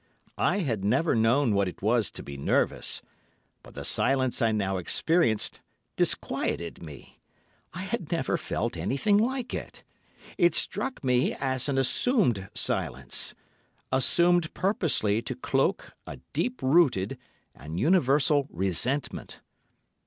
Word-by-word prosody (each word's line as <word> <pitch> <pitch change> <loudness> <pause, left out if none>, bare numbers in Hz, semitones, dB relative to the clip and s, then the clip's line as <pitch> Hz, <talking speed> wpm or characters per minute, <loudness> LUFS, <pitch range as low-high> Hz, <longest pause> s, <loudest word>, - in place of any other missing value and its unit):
I 205 - +2
had 115 - -2
never 130 +11 +2
known 115 +2 +3
what 100 -1 +2
it 90 - -8
was 110 0 +2
to - - -9
be 70 - -8
nervous, 70 - 0 0.6
but - - -16
the - - -6
silence 130 -2 +1
I 115 -1 +3
now 100 -3 -1
experienced 115 - +1 0.4
disquieted 85 -1 -1
me. 75 -5 -12 0.6
I - - -4
had - - -4
never - - 0
felt - - -3
anything 200 +10 +1
like 250 +2 -1
it. - - -7 0.6
It 175 0 +4
struck 240 - -2
me 125 0 +2
as 130 0 -1
an 135 - 0
assumed 135 - +1
silence—assumed 170 +5 0
purposely 155 - +1
to 115 - -5
cloak - - -1 0.2
a - - -7 0.2
deep 250 +1 -2
rooted 130 - +2 0.3
and 80 +5 -7
universal 145 - +3
resentment. 95 - -1
130 Hz, 125 wpm, -27 LUFS, 105-170 Hz, 0.6 s, It